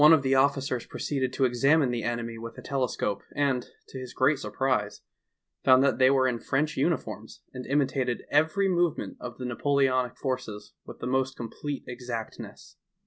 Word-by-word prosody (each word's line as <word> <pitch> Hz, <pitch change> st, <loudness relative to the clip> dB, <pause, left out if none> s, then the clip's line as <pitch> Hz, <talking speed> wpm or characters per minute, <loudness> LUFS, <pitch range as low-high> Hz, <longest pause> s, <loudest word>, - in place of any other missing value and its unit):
of 160 Hz, -4 st, +6 dB
the 135 Hz, 0 st, +2 dB
officers 135 Hz, -2 st, +1 dB
proceeded 130 Hz, -3 st, -2 dB
to 135 Hz, -, +1 dB
examine 135 Hz, +3 st, +3 dB
the 120 Hz, -1 st, -2 dB
enemy 115 Hz, 0 st, -3 dB
with 115 Hz, +1 st, -8 dB
a -, -, -8 dB
telescope, 125 Hz, -7 st, -1 dB
and 135 Hz, -4 st, 0 dB, 0.2 s
to 130 Hz, -, -8 dB
his 125 Hz, -1 st, -8 dB
great 135 Hz, +2 st, +3 dB
surprise 125 Hz, -7 st, -1 dB, 0.6 s
found 130 Hz, 0 st, +6 dB
that 140 Hz, -1 st, +2 dB
they 130 Hz, 0 st, +6 dB
were 130 Hz, -1 st, +4 dB
in 120 Hz, -2 st, -1 dB
French 150 Hz, +5 st, 0 dB
uniforms 115 Hz, -8 st, -2 dB
and 125 Hz, -1 st, -7 dB
imitated 135 Hz, -3 st, 0 dB
every 160 Hz, +7 st, +3 dB
movement 175 Hz, -3 st, 0 dB
of 120 Hz, -1 st, -7 dB
the 125 Hz, -, -5 dB
Napoleonic 130 Hz, 0 st, +1 dB
forces 125 Hz, -6 st, -4 dB
with -, -, -9 dB
the -, -, -3 dB
most 130 Hz, +1 st, 0 dB
complete 135 Hz, +4 st, -5 dB
exactness. 120 Hz, -2 st, -7 dB
130 Hz, 165 wpm, -27 LUFS, 120-140 Hz, 0.6 s, of